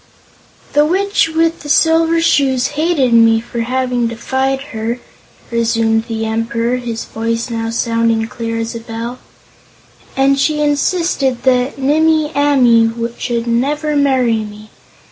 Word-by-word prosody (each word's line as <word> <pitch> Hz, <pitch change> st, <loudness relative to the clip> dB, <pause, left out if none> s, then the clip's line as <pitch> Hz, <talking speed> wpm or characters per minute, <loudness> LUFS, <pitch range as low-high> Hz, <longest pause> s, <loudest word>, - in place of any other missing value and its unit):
"The 295 Hz, -, +4 dB
Witch 380 Hz, +2 st, +1 dB
with 325 Hz, +1 st, 0 dB
the 295 Hz, -, -9 dB
Silver 325 Hz, +2 st, +3 dB
Shoes 270 Hz, -5 st, +2 dB
hated 300 Hz, -5 st, 0 dB
me 225 Hz, -1 st, +5 dB
for 235 Hz, +1 st, -7 dB
having 250 Hz, 0 st, -1 dB
defied 265 Hz, +3 st, -2 dB
her," 225 Hz, +2 st, -3 dB, 0.5 s
resumed 225 Hz, -1 st, +1 dB
the 225 Hz, -1 st, -3 dB
Emperor, 230 Hz, +2 st, -1 dB
his 235 Hz, -2 st, -5 dB
voice 230 Hz, +2 st, -3 dB
now 225 Hz, 0 st, -3 dB
sounding 230 Hz, -1 st, 0 dB
clear 230 Hz, -1 st, -4 dB
as 225 Hz, 0 st, -3 dB
a 230 Hz, -, -5 dB
bell, 230 Hz, +2 st, -6 dB, 1.0 s
"and 275 Hz, +1 st, +3 dB
she 300 Hz, +2 st, +1 dB
insisted 290 Hz, -3 st, 0 dB
that 255 Hz, 0 st, +1 dB
Nimmie 310 Hz, +2 st, +2 dB
Amee 250 Hz, -6 st, +4 dB, 0.3 s
should 235 Hz, -2 st, -2 dB
never 290 Hz, +6 st, -1 dB
marry 260 Hz, -5 st, +2 dB
me. 210 Hz, 0 st, -12 dB
250 Hz, 130 wpm, -16 LUFS, 230-290 Hz, 1.0 s, me